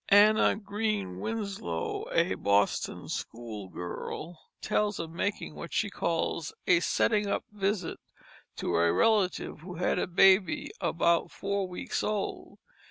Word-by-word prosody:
Anna 210 +2 +6
Green 205 - -2
Winslow, 200 - -3
a - - +2
Boston 100 0 +1
schoolgirl, 115 - -6 0.2
tells 210 -2 0
of 165 -1 -5
making 195 +1 -2
what 170 - -8
she 205 - 0
calls 165 -2 -1
"a 175 -2 +5
setting 210 +3 +2
up 200 - 0
visit" 200 -3 -1 0.6
to - - -2
a 85 0 +4
relative 190 - +2
who 180 +3 -8
had 175 - +1
a - - 0
baby 185 0 +4
about 170 0 +2
four 200 -1 -2
weeks 180 - -3
old. 210 -2 -3
180 Hz, 125 wpm, -29 LUFS, 160-205 Hz, 0.6 s, Anna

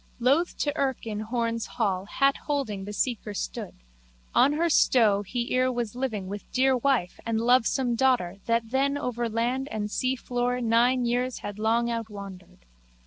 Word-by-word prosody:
Loth 275 +8 +2
to 290 0 -1
irk 270 -5 -1
in 215 -2 -4
Horne's 230 0 -2
hall 195 -5 0
hat 275 +6 +2
holding 225 -10 -2
the 205 - -6
seeker 235 +2 -2
stood. - - -5 0.6
On 285 - +5
her 330 +3 +1
stow 225 -10 +4
he 235 +4 -3
ere 255 0 +2
was 240 -3 -3
living 225 -7 -3
with 200 +1 -7
dear 260 +1 +3
wife 250 -8 0
and 230 -1 -1
lovesome 245 +1 +2
daughter 235 -7 +1
that 230 -1 0
then 275 +2 +1
over 240 -3 -2
land 245 +4 -1
and 210 -3 -3
seafloor 250 -1 -1
nine 240 +2 +3
years 245 +1 -1
had 205 0 -6
long 230 +2 +2
outwandered. 200 - -7
235 Hz, 160 wpm, -27 LUFS, 215-255 Hz, 0.6 s, On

